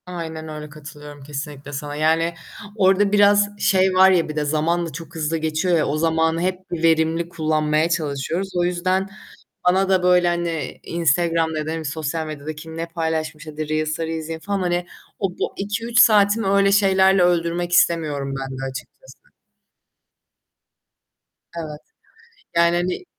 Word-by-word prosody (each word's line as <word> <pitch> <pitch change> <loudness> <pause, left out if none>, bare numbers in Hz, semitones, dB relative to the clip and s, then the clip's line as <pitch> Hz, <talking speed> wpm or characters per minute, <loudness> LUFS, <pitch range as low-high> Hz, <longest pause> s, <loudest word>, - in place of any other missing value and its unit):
Aynen 165 -3 -6
öyle, 150 -1 -7
katılıyorum 150 -1 -11
kesinlikle 145 0 -7
sana, 145 +1 -5
yani 160 +2 +1 0.4
orada 195 0 +3
biraz 205 0 +4
şey 190 -2 +3
var 190 +1 +6
ya 170 -4 +2
bir 155 - -5
de 150 -1 -1
zamanda 165 +3 0
çok 165 +3 -10
hızlı 160 +1 -1
geçiyor 160 +3 0
ya 155 - +1
o 145 - -1
zamanı 160 +1 +1
hep 185 0 -1
verimli 165 0 +1
kullanmaya 155 -1 0
çalışıyoruz. 165 +3 -2
O 175 - +2
yüzden, 185 +2 0 0.6
bana 190 +2 +3
da, 190 -2 +2
böyle, 180 -1 +4
hani, 170 -2 -2
Instagram'da 165 0 0
ya 155 - -3
da - - -2
hani 160 -1 -4
sosyal 160 +2 -3
medyada 155 0 -6
kim 160 +1 -9
ne 165 - -2
paylaşmış 160 -2 -3
hadi 155 0 -5
Reels'ları 155 +1 -1
izleyeyim 160 0 -5
falan, 200 +3 -3
hani, 175 -1 -1 0.3
o, 195 - 0
bu - - -4
2-3 230 +4 -1
saatimi 210 -1 +5
öyle 200 0 +3
şeylerle 190 -1 +4
öldürmek 175 0 0
istemiyorum 150 -6 +1
ben 135 0 -6
de - - -5
açıkçası. - - -12 2.3
Evet. 155 -3 -6 0.8
Yani 170 0 +4
hani 180 - -2
165 Hz, 150 wpm, -21 LUFS, 155-180 Hz, 2.3 s, var